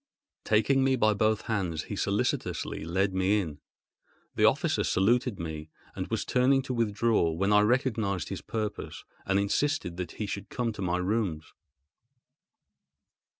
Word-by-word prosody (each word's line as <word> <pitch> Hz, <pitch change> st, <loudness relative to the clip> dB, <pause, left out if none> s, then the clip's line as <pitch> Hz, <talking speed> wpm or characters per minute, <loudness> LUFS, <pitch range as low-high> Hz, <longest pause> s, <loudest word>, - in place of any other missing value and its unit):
Taking 110 Hz, +6 st, +3 dB
me 135 Hz, 0 st, +3 dB
by 110 Hz, -3 st, +3 dB
both 110 Hz, +1 st, +1 dB
hands 90 Hz, -8 st, -2 dB
he -, -, -6 dB
solicitously -, -, -1 dB
led 95 Hz, +4 st, 0 dB
me 95 Hz, +3 st, +2 dB
in. 80 Hz, -7 st, -5 dB, 0.7 s
The -, -, +3 dB
officer -, -, +2 dB
saluted 120 Hz, +3 st, +1 dB
me 80 Hz, -1 st, -6 dB, 0.3 s
and -, -, -4 dB
was -, -, -2 dB
turning 130 Hz, +2 st, +3 dB
to 130 Hz, -, -4 dB
withdraw, 115 Hz, -4 st, +2 dB
when 95 Hz, +5 st, +1 dB
I 105 Hz, -, +7 dB
recognised 110 Hz, -, 0 dB
his -, -, -5 dB
purpose, 110 Hz, -2 st, -5 dB, 0.2 s
and 95 Hz, +1 st, +2 dB
insisted 100 Hz, -, 0 dB
that 90 Hz, -1 st, -5 dB
he 110 Hz, -, -4 dB
should 100 Hz, +1 st, -5 dB
come 120 Hz, -2 st, -2 dB
to 105 Hz, -, -7 dB
my 90 Hz, -1 st, 0 dB
rooms. 90 Hz, -5 st, -2 dB
105 Hz, 150 wpm, -28 LUFS, 90-115 Hz, 0.7 s, I